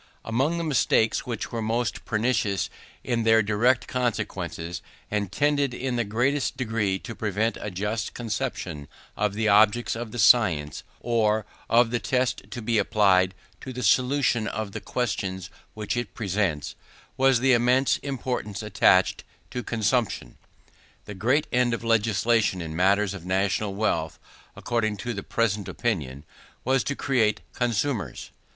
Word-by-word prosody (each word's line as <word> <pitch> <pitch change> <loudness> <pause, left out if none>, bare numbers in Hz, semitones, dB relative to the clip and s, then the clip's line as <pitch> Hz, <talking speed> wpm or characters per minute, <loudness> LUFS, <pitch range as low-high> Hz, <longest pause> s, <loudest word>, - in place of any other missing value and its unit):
Among 135 +9 0
the 170 - -2
mistakes 125 -7 +2
which 115 -3 -4
were 115 - -3
most 115 +1 -2
pernicious 110 -4 0 0.3
in 120 -2 0
their 110 -1 +4
direct 115 +5 +2
consequences, 95 -9 -3 0.3
and 105 -2 -1
tended 145 0 +1
in 130 0 -2
the 120 - +1
greatest 125 +6 0
degree 110 -6 0
to 115 +4 -8
prevent 110 +1 -1
a 105 - -3
just 105 +4 -3
conception 110 - -4 0.3
of 105 -1 -1
the 110 0 0
objects 110 +3 +4
of 115 -1 -5
the 120 - -7
science, 100 - +4 0.2
or 110 -3 +1 0.2
of 115 0 +4
the 120 - 0
test 125 +1 -1
to 120 -3 -6
be 115 -1 +2
applied 95 -3 +3 0.2
to 130 - -7
the 125 0 -5
solution 125 0 +2
of 105 0 -4
the - - -5
questions 95 -6 -3 0.2
which 105 +1 -3
it 120 -2 -4
presents, 95 -8 -1 0.4
was 135 -2 +4
the 130 +1 +4
immense 125 +3 +3
importance 125 -6 -4
attached 105 -2 +3 0.3
to 125 - -3
consumption. 115 0 -1 0.7
The 105 - -7
great 125 +10 +1
end 125 -1 +2
of 115 - -9
legislation 115 -2 +2
in 80 -2 -5
matters 100 +3 +2
of 95 -4 -8
national 95 +2 0
wealth, 90 -7 -1 0.4
according 110 -3 -1
to 120 +5 -4
the 100 - -4
prevalent 105 -2 -1
opinion, 75 - -2 0.4
was 130 +1 +2
to 145 - -1
create 115 -7 +1
consumers. 120 -1 -2
110 Hz, 145 wpm, -25 LUFS, 100-125 Hz, 0.7 s, their